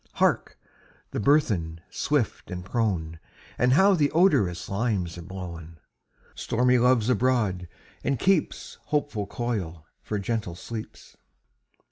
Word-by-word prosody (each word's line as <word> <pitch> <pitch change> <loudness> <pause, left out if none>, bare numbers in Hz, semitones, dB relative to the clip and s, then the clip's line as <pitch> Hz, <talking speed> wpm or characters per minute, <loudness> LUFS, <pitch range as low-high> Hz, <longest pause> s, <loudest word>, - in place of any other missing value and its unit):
Hark! - - +1 0.5
the - - -3
burthen, 100 - +2
swift 145 -6 -1
and 90 -1 -6
prone! 90 -8 -1 0.4
And 125 +1 +4
how 195 +7 +6
the 150 -5 +3
odorous 105 - +3
limes 100 -5 -1
are - - -7
blown! 85 -3 -8 0.6
Stormy 125 +2 +2
Love's 125 -2 +3
abroad, 110 -7 +1 0.4
and 140 - 0
keeps 190 0 0
Hopeful 145 -9 -1
coil 95 -10 -4 0.2
for 105 - -3
gentle 100 -3 -2
sleeps. 110 +4 -9
110 Hz, 115 wpm, -26 LUFS, 90-125 Hz, 0.6 s, how